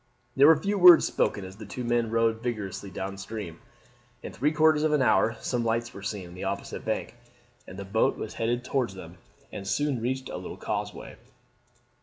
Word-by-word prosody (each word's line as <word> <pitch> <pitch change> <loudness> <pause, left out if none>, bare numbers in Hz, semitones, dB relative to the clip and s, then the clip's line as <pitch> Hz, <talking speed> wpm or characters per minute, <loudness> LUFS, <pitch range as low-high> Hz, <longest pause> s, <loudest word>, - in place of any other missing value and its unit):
There 140 +2 +7
were 160 -1 +7
few 200 +4 -1
words 180 -2 +9
spoken 100 - -1
as 95 +1 -11
the 110 - -9
two 125 - -6
men 120 -1 0
rowed 115 0 +1
vigorously 105 -5 -4
down 95 +1 -6
stream. 100 -5 -7 0.6
In - - -7
three 150 +3 +1
quarters 155 -1 +4
of 155 0 +1
an 150 - +3
hour 115 -2 +3
some 120 -2 -1
lights 115 +1 -1
were 100 - -9
seen 100 -2 -5
on - - -12
the 90 - -8
opposite - - -4
bank, - - -3 0.5
and 95 - -10
the 100 - -6
boat 105 +3 +1
was 110 - -6
headed 120 +2 -1
towards 125 -8 -1
them 90 -1 -11 0.3
and 95 - -7
soon 135 +4 0
reached 130 +2 -2
a - - -5
little - - -8
causeway. - - -5
115 Hz, 200 wpm, -27 LUFS, 100-130 Hz, 0.6 s, words